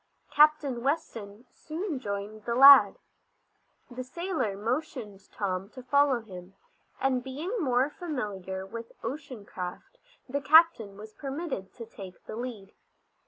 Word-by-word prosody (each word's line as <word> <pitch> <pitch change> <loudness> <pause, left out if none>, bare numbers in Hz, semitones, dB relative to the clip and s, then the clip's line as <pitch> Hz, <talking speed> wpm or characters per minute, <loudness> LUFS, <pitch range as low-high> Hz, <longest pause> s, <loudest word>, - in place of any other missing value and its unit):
Captain 295 -5 +4
Weston 235 -6 -3
soon 320 -1 -5
joined 205 -1 -6
the 235 - -1
lad. 275 +2 +9 0.9
The 255 +1 -5
sailor 315 - -3
motioned 230 -3 -4
Tom 190 -1 -3
to 255 - -9
follow 280 -1 +3
him, 185 -3 -12 0.4
and 260 -2 +1
being 310 - -4
more 260 -3 +1
familiar 205 - -5
with 230 +3 -9
ocean 255 -7 -6
craft 180 - -8 0.3
the 280 +2 -2
captain 280 -9 +5
was 215 +1 -11
permitted 275 - -5
to 230 - -8
take 195 -4 -12
the - - -7
lead. 230 -5 -7
245 Hz, 125 wpm, -28 LUFS, 205-285 Hz, 0.9 s, lad